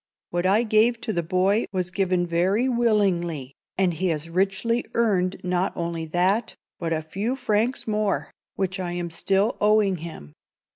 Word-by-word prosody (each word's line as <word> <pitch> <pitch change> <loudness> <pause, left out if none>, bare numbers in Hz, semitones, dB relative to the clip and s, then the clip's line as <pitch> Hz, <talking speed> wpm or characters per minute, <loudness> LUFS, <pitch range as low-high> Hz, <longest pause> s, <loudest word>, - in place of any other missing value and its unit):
What 175 +1 0
I 210 +5 +4
gave 225 +1 +3
to 225 -1 -2
the 170 - 0
boy 185 +5 +1
was 185 -2 -1
given 185 -2 +1
very 185 +8 +1
willingly, 190 - +1 0.2
and 185 -2 +2
he 185 +4 -1
has 165 -1 -2
richly 195 +6 +1
earned 195 -6 +1
not 180 +1 0
only 170 -1 -3
that, 185 +7 +1 0.2
but 165 -2 -2
a 160 -1 0
few 200 +10 -2
francs 230 0 0
more, 210 -2 -1 0.2
which 190 -1 -2
I 175 -2 -3
am 175 -1 -4
still 195 +6 +1
owing 210 -2 +3
him. 155 - -9
190 Hz, 160 wpm, -24 LUFS, 175-215 Hz, 0.2 s, I